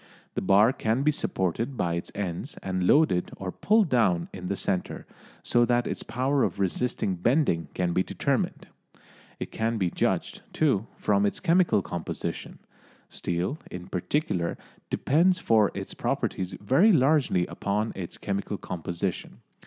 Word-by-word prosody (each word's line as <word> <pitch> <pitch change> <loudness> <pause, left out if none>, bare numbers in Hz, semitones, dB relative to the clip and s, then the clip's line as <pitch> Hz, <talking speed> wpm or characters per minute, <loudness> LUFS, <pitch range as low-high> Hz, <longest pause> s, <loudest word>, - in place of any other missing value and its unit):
The - - -2
bar 105 +6 +5
can 115 +3 0
be 150 - +4
supported 115 - -2
by 85 -1 0
its 85 +1 -4
ends 100 - -4
and 95 -1 -1
loaded 145 - +4
or 95 -1 -4
pulled 210 - +2
down 95 -10 +2
in 90 -1 -6
the 100 - -1
centre, 95 -1 -2 0.4
so 120 - +3
that 120 0 +2
its - - -3
power 130 +3 0
of 100 - 0
resisting 100 +1 0
bending 90 - +2
can 90 -1 0
be 90 - +3
determined. - - -1 0.7
It - - -5
can 115 +1 -1
be 90 -4 0
judged, - - -1
too, 130 -9 +1
from 100 -1 +2
its 100 - 0
chemical 175 - +3
composition. 85 -2 -5 0.5
Steel, 90 - -2
in 90 +1 -8
particular, 90 - -1 0.3
depends 175 +6 +3
for 110 - +3
its - - -5
properties 95 -1 -2
very 135 - +4
largely 135 - +3
upon 105 +4 -2
its 90 -3 -6
chemical 100 0 -3
composition. 90 +1 -4
100 Hz, 145 wpm, -27 LUFS, 90-135 Hz, 0.7 s, bar